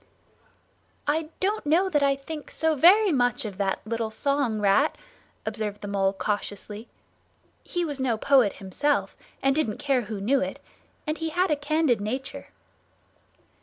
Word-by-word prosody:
"I 310 Hz, +1 st, 0 dB
don't 410 Hz, +3 st, 0 dB
know 330 Hz, +6 st, +3 dB
that 295 Hz, -6 st, +1 dB
I 280 Hz, -1 st, +3 dB
think 295 Hz, +2 st, -8 dB
so 320 Hz, 0 st, +1 dB
very 370 Hz, +8 st, +6 dB
much 245 Hz, -5 st, +1 dB
of 205 Hz, -2 st, -6 dB
that 195 Hz, -1 st, 0 dB
little 225 Hz, 0 st, -2 dB
song, 270 Hz, -1 st, 0 dB
Rat," 210 Hz, +9 st, +3 dB, 0.5 s
observed 215 Hz, -1 st, -4 dB
the 205 Hz, -, -6 dB
Mole 195 Hz, -1 st, +1 dB
cautiously. 205 Hz, +2 st, -4 dB, 0.8 s
He 350 Hz, -1 st, -2 dB
was 290 Hz, -4 st, -4 dB
no 250 Hz, -4 st, +1 dB
poet 255 Hz, -4 st, +4 dB
himself 200 Hz, +10 st, -1 dB, 0.3 s
and 270 Hz, 0 st, +4 dB
didn't 285 Hz, -9 st, 0 dB
care 270 Hz, -3 st, +1 dB
who 215 Hz, -2 st, -5 dB
knew 260 Hz, +7 st, +2 dB
it; 275 Hz, -, -3 dB, 0.5 s
and 305 Hz, +1 st, -2 dB
he 325 Hz, 0 st, -2 dB
had 355 Hz, +2 st, +1 dB
a -, -, +4 dB
candid 290 Hz, -5 st, +1 dB
nature. 255 Hz, +6 st, -4 dB
270 Hz, 155 wpm, -26 LUFS, 215-310 Hz, 0.8 s, very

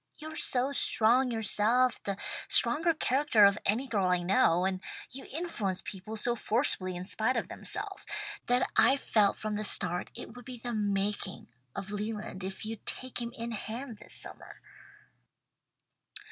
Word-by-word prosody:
You 310 Hz, 0 st, -7 dB
are -, -, -8 dB
so 260 Hz, -1 st, +1 dB
strong 250 Hz, -1 st, +3 dB
yourself, 230 Hz, +2 st, +2 dB
the 200 Hz, -1 st, -3 dB, 0.3 s
strongest 320 Hz, +1 st, +3 dB
character 255 Hz, -5 st, +5 dB
of 200 Hz, +1 st, +4 dB
any 225 Hz, +7 st, +2 dB
girl 205 Hz, -7 st, +1 dB
I 180 Hz, -1 st, +2 dB
know, 180 Hz, -1 st, +4 dB
and 190 Hz, -1 st, 0 dB, 0.3 s
you 270 Hz, +2 st, -6 dB
influence 250 Hz, -, -2 dB
people 210 Hz, +3 st, -6 dB
so 240 Hz, +2 st, +1 dB
forcibly 215 Hz, -6 st, 0 dB
in 180 Hz, +1 st, -5 dB
spite 225 Hz, +6 st, +1 dB
of -, -, -2 dB
themselves, -, -, -3 dB, 0.4 s
that 245 Hz, +1 st, +3 dB
I've 275 Hz, +1 st, +5 dB
felt 205 Hz, -3 st, +3 dB
from 215 Hz, -1 st, -2 dB
the 215 Hz, -, -2 dB
start 180 Hz, -3 st, +1 dB
it -, -, -8 dB
would 245 Hz, -, -11 dB
be 255 Hz, -1 st, -7 dB
the 240 Hz, +1 st, -4 dB
making 200 Hz, -2 st, -1 dB, 0.3 s
of 195 Hz, +1 st, -5 dB
Leland 210 Hz, -2 st, -4 dB
if 190 Hz, +3 st, -5 dB
you'd 220 Hz, 0 st, -5 dB
take 255 Hz, -1 st, -3 dB
him 235 Hz, 0 st, -3 dB
in 230 Hz, +1 st, -4 dB
hand 225 Hz, +1 st, -5 dB
this 210 Hz, -, -8 dB
summer." -, -, -7 dB
220 Hz, 160 wpm, -31 LUFS, 200-250 Hz, 0.4 s, character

